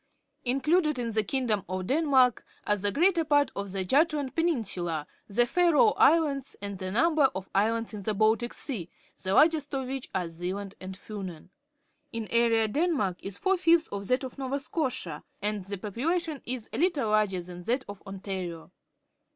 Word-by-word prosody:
— - - -50
Included 300 +4 +2
in 235 -2 -2
the 220 0 +1
kingdom 220 -3 0
of 185 0 -3
Denmark 265 - +3 0.2
are - - +2
tlie 205 0 0
greater 340 - +3
part 290 -2 +3
of 200 -1 -4
the 190 0 -2
Jutland 290 - +2
peninsuhi, 195 - -1 0.2
the 235 +4 +3
Faroe 350 - +4
Islands, 290 -5 +3
and 200 -1 -6
a 185 0 -3
nuinber 300 - +4
of 190 0 -5
islands 225 +3 +1
in 210 - -5
the 210 +2 -1
Bal^c_^eaj 220 - 0 0.3
the 190 - -2
largest 300 -2 +4
of 265 -1 -2
which 265 0 -4
are 180 -2 0
Zealand 185 +4 -5
and 190 0 -7
Fiinen. 190 -6 -8 0.6
In 230 -2 -4
area 230 -1 +3
Denmark 275 - 0
is 195 0 -6
four 385 0 +2
fifths 335 -2 +3
of 200 -1 -5
that 255 +2 +1
of 260 +1 -7
Nova 270 +1 -1
Scotia, 260 - -3 0.2
and 205 -1 -2
the 200 +1 -4
population 300 - -2
is 245 -3 -2
a 225 - -2
httle 315 -8 +2
larger 210 -4 +2
than 180 0 -9
that 250 +3 0
of 205 -1 -9
Ontario. 190 -4 -6
230 Hz, 175 wpm, -28 LUFS, 195-290 Hz, 0.6 s, Faroe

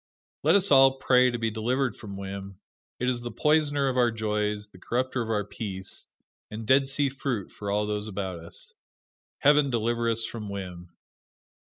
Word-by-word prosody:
Let - - +4
us 200 -3 +3
all 135 -1 +7
pray 125 -1 +4
to 120 - -2
be 115 -1 -1
delivered 120 +3 0
from 100 -3 -9
whim 100 0 -7 0.4
it 125 - -1
is 125 -1 +1
the 120 - -5
poisoner 145 +2 +2
of 130 -1 -1
our 120 -1 +4
joys, 105 -2 -2
the 90 - -17
corrupter 125 +4 -1
of 115 - -4
our 105 -2 +1
peace, 100 -3 -2 0.4
and 110 +1 -6
Dead 135 +3 +4
Sea 140 +1 +1
fruit 135 -6 -3
for 100 - -6
all 105 +1 +1
those 105 0 -3
about 95 -4 -4
us. 85 +1 -5 0.7
Heaven 145 0 +5
deliver 115 0 0
us 115 0 +1
from 110 -3 -6
whim! 90 -3 -7
115 Hz, 180 wpm, -27 LUFS, 105-130 Hz, 0.7 s, all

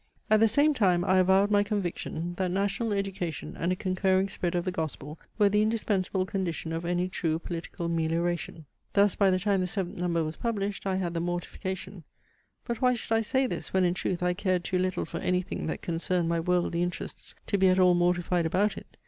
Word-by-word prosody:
At 215 - +6
the 225 - +6
same 290 +7 +3
time 180 -8 +2
I 185 -1 +4
avowed 190 +2 +4
my 205 -1 +5
conviction, 175 -4 -3
that 185 -1 0
national 200 +4 -1
education 195 -5 -3
and 170 +2 -1
a - - +1
concurring 190 0 +1
spread 180 -2 -2
of 175 0 0
the 185 - 0
Gospel 155 -2 -5 0.2
were 210 -2 +5
the 210 +1 +3
indispensable 205 -4 0
condition 180 -4 -3
of 165 +1 -3
any 175 +1 0
true 165 -3 -1
political 170 0 -5
melioration. 165 0 -1 0.3
Thus 200 -1 +4
by 200 -2 +3
the 185 - +3
time 195 0 +1
the 180 - 0
seventh 180 -2 -4
number 170 -2 +1
was 155 0 -5
published, 205 -4 -2
I 190 - +1
had 180 -2 -2
the 170 - -1
mortification 185 +1 -4 0.6
(but 235 +1 -3
why 250 -1 +4
should 225 - -3
I 225 - +3
say 260 +4 +1
this, - - -5
when 190 -1 +3
in 175 - +2
truth 180 -1 -2
I 180 0 +2
cared 185 -1 0
too 185 - -1
little 185 0 -1
for - - -5
any 180 0 +1
thing - - -5
that - - -4
concerned 170 +1 -1
my 170 0 +1
worldly 175 0 +1
interests 175 0 -5
to 200 - 0
be 190 - +5
at 185 0 +4
all 180 -1 +6
mortified 175 -1 +1
about 200 +6 +1
it?) - - -12
185 Hz, 215 wpm, -28 LUFS, 175-200 Hz, 0.6 s, At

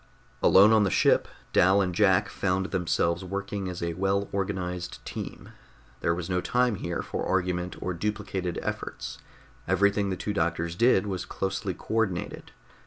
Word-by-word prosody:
Alone 100 +4 +7
on 110 -1 +5
the 100 - +2
ship, - - +3 0.3
Dal 95 +2 +5
and 95 -2 0
Jack 95 -1 +4
found 95 0 -1
themselves 85 -1 0
working 100 0 -4
as 90 -1 -5
a 85 0 -1
well 95 +3 0
organized 90 -3 -3
team. - - -7 0.5
There 85 - +1
was 85 -1 -4
no 90 -1 0
time 125 -2 +1
here 85 -1 -3
for - - -4
argument 90 -1 -1
or 90 - -1
duplicated 95 -1 -3
efforts; - - -5 0.5
everything 100 +2 +2
the 95 - -2
two 105 - -3
doctors 85 -1 -1
did 115 -1 +4
was 95 -3 -3
closely 95 0 -3
co - - -7
ordinated. 110 -6 -1
95 Hz, 160 wpm, -27 LUFS, 90-100 Hz, 0.5 s, Alone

